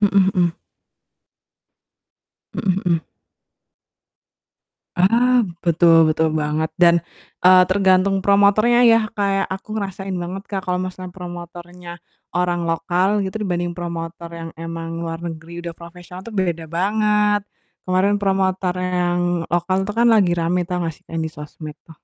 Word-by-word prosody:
Mhm 195 -2 +4
mhm. 175 -3 +2 2.0
Mhm 190 -2 0
mhm. 170 -2 +2 2.0
Ah, 235 +5 +4 0.2
betul 170 0 +4 0.2
betul 160 +1 +1
banget 150 +1 -1
dan, 170 -1 +7 0.5
eee, 185 0 +8
tergantung 190 0 +3
promotornya 205 +4 +4
ya 230 - +6 0.2
kayak 195 -2 0
aku 195 - -11
ngerasain 195 -1 -4
banget 185 +3 -5
Kak, 195 -2 -4
kalau 180 0 -1
maksudnya 185 -1 -7
promotornya, 175 0 -9 0.4
orang 175 -1 0
lokal 180 +5 +1
gitu 190 +1 -4
dibanding 175 -3 -1
promotor 170 -1 -6
yang 165 0 -7
emang 165 0 -6
luar 165 -1 -4
negeri 170 0 -7
udah 170 -1 -6
profesional 175 +2 -11
tuh 230 - -8
beda 170 -4 -1
banget, 210 +4 +1 0.5
kemarin 190 +3 +2
promotornya 190 -2 0 0.3
yang 175 - 0 0.3
lokal 175 +2 0
itu 210 - -3
kan 235 - +4
lagi 195 -5 +4
rame 175 +1 0
tau 180 -1 -2
gak 165 -2 -3
sih? - - -37
Yang 165 0 -3
di - - -7
sosmed 150 +1 -9
tuh. 165 - -14
180 Hz, 135 wpm, -20 LUFS, 170-195 Hz, 2.0 s, eee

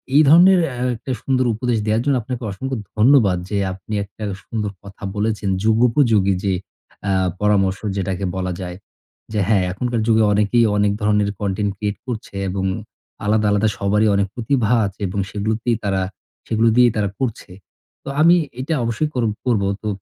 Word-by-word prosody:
এই 150 - +8
ধরনের 180 +4 +7
অ্যা 125 0 -3
একটা 125 +3 -6
সুন্দর 130 -1 +1
উপদেশ 120 +1 -1
দেওয়ার 110 +1 +1
জন্য 140 -1 +2
আপনাকে 125 +1 -5
অসংখ্য 130 +7 -4 0.2
ধন্যবাদ, 110 -6 +5
যে 105 - -1 0.2
আপনি 95 +3 -9
একটা 100 +2 -11 0.2
সুন্দর 105 -2 -3
কথা 100 0 -13
বলেছেন। 105 -1 -1
যুগোপযোগী 110 -3 +3
যে 100 -2 +1 0.6
আ - - +2 0.3
পরামর্শ, 100 -2 +2 0.2
যেটাকে 95 0 -2
বলা 90 -1 -2
যায়। 90 -1 -5 0.6
যে 105 - 0
হ্যাঁ, 100 -4 +3
এখনকার 120 +4 -2
যুগে 110 -1 +4
অনেকেই 105 +3 +3
অনেক 105 0 +3
ধরনের 105 -1 +2
কনটেন্ট 100 0 -1
ক্রিয়েট 105 0 -3
করছে 110 -4 -6
এবং 95 +1 -2 0.6
আলাদা, 105 +1 +2
আলাদা 105 +1 +2
সবারই 105 +2 +2
অনেক 100 0 +1
প্রতিভা 120 -2 0 0.2
আছে 100 +1 -7
এবং 95 +2 -3
সেগুলোতেই 110 +3 -1
তারা 95 -2 0 0.5
সেগুলো 115 +1 +3
দিয়েই 125 -1 +6
তারা 100 -1 0
করছে। 115 -7 -3 0.5
তো - - -15
আমি 170 +3 +7 0.2
এইটা 140 +5 -2
অবশ্যই 115 +7 -1
কর 125 -2 0 0.2
করব। 115 -5 +2 0.2
তো 110 - -5
110 Hz, 165 wpm, -20 LUFS, 100-120 Hz, 0.6 s, এই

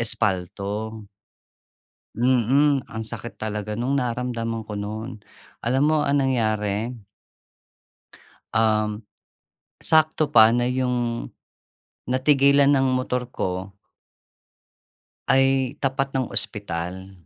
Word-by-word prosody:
espalto. 105 +1 -2 1.1
Mm. 130 +3 +2
Ang 110 0 -5
sakit 115 +1 -7
talaga 105 -1 -4
nung 130 +5 0
naramdaman 115 -2 -3
ko 105 -1 -6
no'n. 110 +2 -6 0.4
Alam 130 +4 +1
mo - - +3
ang 140 -1 +2
nangyari 110 -2 0 1.6
uhm, 110 -1 +1 0.8
sakto 155 -1 +3
pa 110 -1 +8
na 120 - +1
yung 125 -2 -1 0.8
natigilan 140 +2 +4
ng 135 -1 +3
motor 125 -1 -2
ko 95 -3 -4 1.5
ay, 135 0 +3
tapat 135 0 -1
ng 130 -2 -1
ospital. 95 -1 -4
120 Hz, 90 wpm, -23 LUFS, 105-130 Hz, 1.6 s, pa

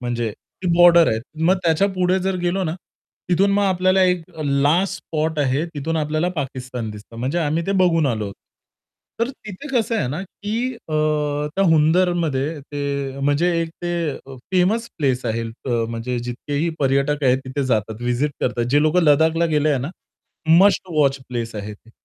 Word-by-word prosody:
म्हणजे 120 -2 -2 0.3
ती - - -2
बॉर्डर 170 -1 +7
आहे. 110 - 0 0.3
मग 185 +3 +4
त्याच्यापुढे 185 +2 +2
जर 190 0 -1
गेलो 185 +2 0
ना 155 - -2 0.5
तिथून 190 +3 +3
मग 205 0 +2
आपल्याला 185 0 +3
एक 180 -2 +2 0.2
लास्ट 155 +6 +1
स्पॉट 160 0 -2
आहे. 140 +2 +1
तिथून 155 +3 -2
आपल्याला 155 +2 0
पाकिस्तान 125 -5 -4
दिसतं, 105 +2 -11
म्हणजे 130 +8 -1
आम्ही 165 +1 -1
ते 195 - +1
बघून 165 -4 +3
आलो. 110 -5 -2 0.9
तर 235 - +2
तिथे 215 -1 -10
कसं 240 -3 0
आहे 205 - 0
ना, 150 +7 -3
की 220 +6 -4
अ, 155 - -6 0.6
त्या 195 - +2
हुंदरमध्ये 160 -2 +2
ते 140 -1 -4
म्हणजे 145 +5 +2
एक 165 - -2
ते - - -2 0.2
अ, 135 -1 -9 0.2
फेमस 205 +6 +2
प्लेस 130 -4 0
आहे 115 +1 -1
अ, 115 +3 -8 0.2
म्हणजे 120 +2 -3
जितकेही 140 +6 -3
पर्यटक 140 +2 +1
आहेत 130 0 +4
तिथे 135 +2 -3
जातात 110 -1 -1
विजीट 125 +5 0
करतात. 120 -1 0
जे 145 +1 +4
लोकं 155 +4 +3
लदाखला 160 +2 +4
गेले 155 -1 +1
आहे 140 - +2
ना, 140 +6 -4 0.7
मस्ट 190 0 +4
वॉच 140 -2 +3
प्लेस 115 -2 -4
आहे 105 0 -5
ते. 115 +2 -22
150 Hz, 170 wpm, -21 LUFS, 130-180 Hz, 0.9 s, बॉर्डर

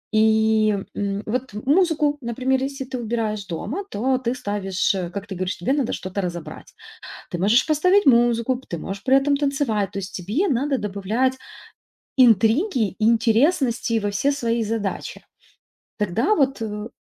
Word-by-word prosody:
И, 220 -1 +3 0.2
м, 200 0 -2
вот 250 +1 -3
музыку, 295 - +2
например, 260 +2 -1
если 275 0 -4
ты 260 0 -5
убираешь 220 -3 -2
дома, 265 - -4
то 255 +5 0
ты 240 -2 -1
ставишь, 200 -4 -1
э, 180 -2 -3
как 200 +2 -6
ты 195 - -6
говоришь, 185 +1 -3
тебе 245 +10 0
надо 280 -5 0
что-то 190 +2 -4
разобрать. 175 -3 -7 0.6
Ты 175 - -2
можешь 210 +6 +3
поставить 365 +4 +3
музыку, 240 0 +3
п 265 - -15
ты 170 - -4
можешь 195 +5 -6
при 265 +1 +5
этом 280 +1 +2
танцевать. 275 -9 0
То 200 - -4
есть 190 0 -8
тебе 215 - -1
надо 275 +1 0
добавлять 215 +5 -1 0.8
интриги 235 - +4
и 215 - +1
интересности 235 +1 +2
во 205 - -2
все 275 +8 +1
свои 235 -4 -1
задачи. 215 -2 -4 0.8
Тогда 210 - +1
вот 270 -4 +1
э 210 0 -4
230 Hz, 160 wpm, -22 LUFS, 205-265 Hz, 0.8 s, при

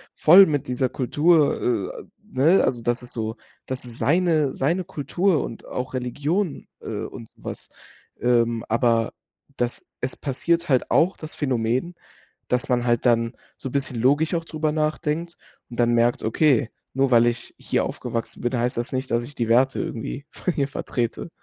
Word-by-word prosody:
voll 185 +5 +8
mit 145 -3 -1
dieser 125 +1 0
Kultur, 140 - +2
äh - - -13 0.2
ne, 155 +9 +3
also 120 -2 0
das 120 +1 -1
ist 125 - -5
so 110 0 -3 0.3
das 130 -1 -4
ist 120 -1 -9
seine 155 +1 +2
seine 170 +7 0
Kultur 175 +1 0
und 115 - -8
auch 125 +1 -5
Religion, 145 - -2 0.2
äh, - - -10 0.2
und 115 - -8
sowas. - - -8 0.5
Ähm, 120 -2 +2
aber 115 0 +2 0.4
das 120 -1 -3 0.2
es 125 +1 -2
passiert 170 +5 0
halt 130 -4 +2
auch 180 +4 +3
das 155 0 -9
Phänomen, 130 +4 0 0.6
dass 125 0 0
man 125 -1 +1
halt 120 0 +1
dann 115 0 +2 0.2
so 130 - -6
bisschen 135 -2 -2
logisch 145 +8 +2
auch 165 -1 -1
drüber 155 -1 -2
nachdenkt 155 +2 -1 0.3
und 120 - -4
dann 120 0 +3
merkt: 120 +1 +2
„Okay, 135 +2 +2 0.2
nur 135 0 +2
weil 120 0 +6
ich 120 0 -2
hier - - 0
aufgewachsen 115 -1 -4
bin, 120 +1 -1
heißt 120 +1 0
das 120 +1 -2
nicht, 130 0 -3
dass 115 - +2
ich 145 - -9
die 115 - -1
Werte 130 +4 +3
irgendwie 140 -3 -4
von 180 - -3
hier 140 - +1
vertrete.“ 120 +1 -3
130 Hz, 170 wpm, -24 LUFS, 120-155 Hz, 0.6 s, voll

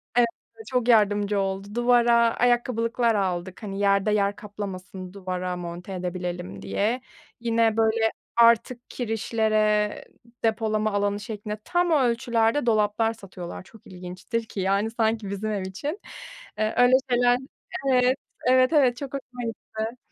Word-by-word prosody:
Evet, 240 -1 +5 0.3
bize 445 - -11
çok 250 -2 0
yardımcı 205 -2 +3
oldu. 195 +2 -3
Duvara 240 -1 +4 0.2
ayakkabılıklar 240 -1 +1
aldık. 185 0 -2
Hani, 195 -1 -5
yerde 200 +1 +3
yer 205 -1 +1
kaplamasın, 190 -2 -7
duvara 185 -2 -4
monte 175 +2 -7
edebilelim, 180 -1 -4
diye. 230 +5 -1 0.4
Yine, 230 -1 +2
böyle, 225 0 +2 0.2
artık 235 +1 +3
kirişlere 215 -2 +1 0.5
depolama 215 -1 +1
alanı 205 0 0
şeklinde 210 -1 -6
tam 350 -1 +1
ölçülerde 235 -2 +2
dolaplar 220 0 +2
satıyorlar. 185 -5 -9
Çok 225 +2 -18
ilginçtir 185 +6 -5
ki, 210 - -7
yani, 195 +4 +1
sanki 220 -3 0
bizim 210 +2 -3
ev 205 - -2
için. 285 - -5 0.6
Iıı, 215 0 +1
öyle 245 +1 +5 0.2
şeyler 245 0 +4 0.5
Evet, 255 +1 +3 0.3
evet, 255 +3 +4
evet, 255 -5 +4
çok 280 -1 -7
hoşuma 255 -2 -6
gitti. 225 0 -5
220 Hz, 130 wpm, -25 LUFS, 200-240 Hz, 0.6 s, Evet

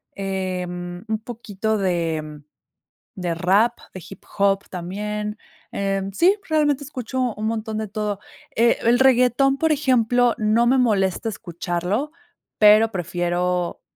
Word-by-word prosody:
Em, 180 -2 -4
un 220 0 -1
poquito 220 -2 -3
de 165 -5 -2 0.7
de 175 -2 -2
rap, 190 +7 +2 0.2
de 185 - -8
hip-hop 195 0 -1
también. 210 +4 -4 0.3
Em, 195 0 -2
sí, 370 - +4
realmente 295 -2 +2
escucho 260 -2 -5 0.2
un 215 - -4
montón 220 -1 -3
de 220 -1 -3
todo, 210 -1 -3 0.4
eh, 235 +1 +3
el 235 +2 +4
reguetón, 265 +1 +4
por 320 +2 +1
ejemplo, 245 -4 +2
no 220 +2 +2
me 260 +2 +4
molesta 210 -3 +1
escucharlo, 180 - -3 0.5
pero 215 +1 +6
prefiero 175 0 -1
210 Hz, 120 wpm, -22 LUFS, 180-240 Hz, 0.7 s, pero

